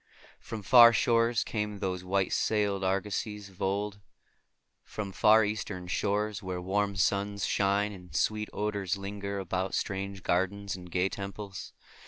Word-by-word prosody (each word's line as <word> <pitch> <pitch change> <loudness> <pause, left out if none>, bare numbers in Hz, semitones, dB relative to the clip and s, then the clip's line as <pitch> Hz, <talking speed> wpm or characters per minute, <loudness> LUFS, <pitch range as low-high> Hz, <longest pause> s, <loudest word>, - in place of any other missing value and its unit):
From 110 -2 -7
far 120 +3 +8
shores 115 0 +2
came 105 -2 -3
those 90 -2 -3
white 95 +1 0
sailed 100 -3 +1
argosies 100 +1 -2
of 95 - -17
old; 100 +1 -1 0.8
from 100 -2 -6
far 110 +2 +5
Eastern 105 -3 -4
shores 105 +3 -1
where 95 -2 -4
warm 100 +2 0
suns 100 +1 0
shine 100 +1 +1
and 90 -6 -12
sweet 105 +7 0
odors 100 -2 -2
linger 100 0 -5
about 95 0 -2
strange 95 -1 -3
gardens 95 +2 0
and 90 -1 -10
gay 90 +2 +1
temples. 100 0 -7
100 Hz, 140 wpm, -29 LUFS, 95-105 Hz, 0.8 s, far